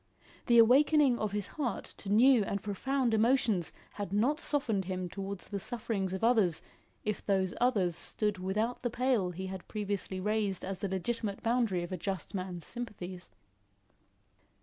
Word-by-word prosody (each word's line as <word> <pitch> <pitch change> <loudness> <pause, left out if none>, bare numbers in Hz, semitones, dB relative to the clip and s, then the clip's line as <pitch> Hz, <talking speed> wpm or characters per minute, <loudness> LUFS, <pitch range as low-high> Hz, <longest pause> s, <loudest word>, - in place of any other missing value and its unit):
The 235 -2 +5
awakening 265 +2 +6
of 215 -2 -1
his 205 -1 -2
heart 270 -2 -3
to 195 - -8
new 235 +2 +6
and 200 0 -3
profound 245 +4 0
emotions 220 - +2 0.2
had 205 -3 -5
not 245 +10 +2
softened 235 - 0
him 185 -1 -3
towards 195 +1 -6
the 200 - -3
sufferings 210 -4 -3
of 190 +3 -4
others 215 -9 +3 0.4
if 210 -1 -2
those 190 -2 +1
others 200 -9 +2
stood 210 +1 -1
without 210 +6 -1
the 245 - -1
pale 245 -6 +1
he 185 +2 -5
had 190 -1 -7
previously 200 -3 -3
raised 210 -1 -1
as 190 -1 -4
the 200 - -2
legitimate 200 +2 -2
boundary 230 -7 +1
of 175 - -7
a 185 - -2
just 190 -4 -4
man's 185 -4 -4
sympathies. 190 -7 -6
205 Hz, 160 wpm, -31 LUFS, 190-240 Hz, 0.4 s, awakening